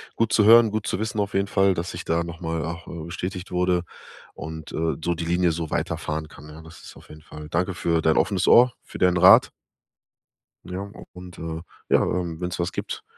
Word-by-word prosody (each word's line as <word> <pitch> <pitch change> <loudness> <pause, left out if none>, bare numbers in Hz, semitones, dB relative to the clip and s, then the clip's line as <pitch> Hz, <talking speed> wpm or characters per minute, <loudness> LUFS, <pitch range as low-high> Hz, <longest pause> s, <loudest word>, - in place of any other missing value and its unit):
Gut 115 -1 0
zu 105 - +4
hören, 115 -1 +7
gut 110 -1 -3
zu - - -1
wissen 110 0 -3
auf 100 0 -2
jeden 100 0 +1
Fall, 95 -1 +3
dass 85 +1 -4
ich 85 - -7
da 85 +1 0
noch 85 0 -8
mal 80 -2 -3
auch, 85 +1 -7
äh, 85 -2 -7
bestätigt 90 +2 -6
wurde 90 0 +1 0.5
und, 80 -1 -8
äh, 80 0 -1
so 85 - +1
die 85 - -4
Linie 85 +1 +2
so 80 -1 -4
weiterfahren 80 0 -3
kann, 75 - -14
ja? 80 +2 -11
Das 80 +1 -14
ist - - -12
auf - - -17
jeden 75 0 -12
Fall 75 0 -11
Danke 90 +3 -1
für 85 -2 0
dein 80 0 +2
offenes 95 -3 +1
Ohr, 125 +1 +7
für - - -10
deinen 90 -1 +3
Rat. 95 +2 +7 1.2
Ja, 90 +2 -5
auch - - -12
und 90 -1 -11
äh, 80 0 -5 0.3
ja, - - +4
ähm, 85 -3 -2
wenn's 90 0 -4
was 85 0 -1
gibt, - - -5
85 Hz, 225 wpm, -24 LUFS, 80-95 Hz, 1.2 s, hören